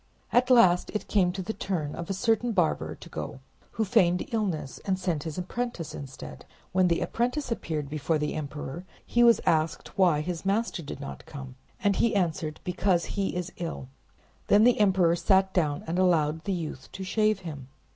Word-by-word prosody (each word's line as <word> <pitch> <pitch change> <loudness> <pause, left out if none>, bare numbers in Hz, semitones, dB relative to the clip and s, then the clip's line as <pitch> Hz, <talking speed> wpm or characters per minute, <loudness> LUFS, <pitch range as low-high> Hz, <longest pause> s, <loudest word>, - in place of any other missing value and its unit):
At 250 +1 +4
last 185 -8 +5
it 210 - -2
came 185 -4 +3
to 190 +1 -5
the 220 - -3
turn 175 -8 -3
of 170 +1 -6
a - - 0
certain 225 +3 +1
barber 175 -6 +1
to - - -13
go - - -6 0.3
who 220 - 0
feigned 185 -4 +3
illness, 185 -11 -2
and 190 -1 0
sent 175 -5 -1
his 160 -2 -5
apprentice 180 -4 -4
instead. 135 -3 -9 0.3
When 185 0 +3
the 170 -1 +1
apprentice 250 +3 -1
appeared 155 -9 -2
before 155 +2 -1
the 150 0 -2
emperor 145 +2 -5 0.2
he 240 - +3
was 235 -1 +6
asked 160 0 0
why 170 -6 +4
his 170 +1 -4
master 200 -1 0
did 145 - -7
not 140 - -8
come, 135 -3 -8 0.3
and 200 -2 +3
he 230 -3 +2
answered, 160 -5 -1
"Because 180 -1 +1
he 195 -2 -1
is 180 +1 -3
ill." 165 -6 -5 0.6
Then 205 +1 +6
the 245 -1 +5
emperor 185 -5 +4
sat 190 +2 +3
down, 150 -5 0
and 170 +3 -1
allowed 160 -4 +2
the 195 - 0
youth 155 -6 -5
to 190 - -5
shave 215 +1 +1
him. 145 -7 -7
180 Hz, 185 wpm, -27 LUFS, 155-200 Hz, 0.6 s, was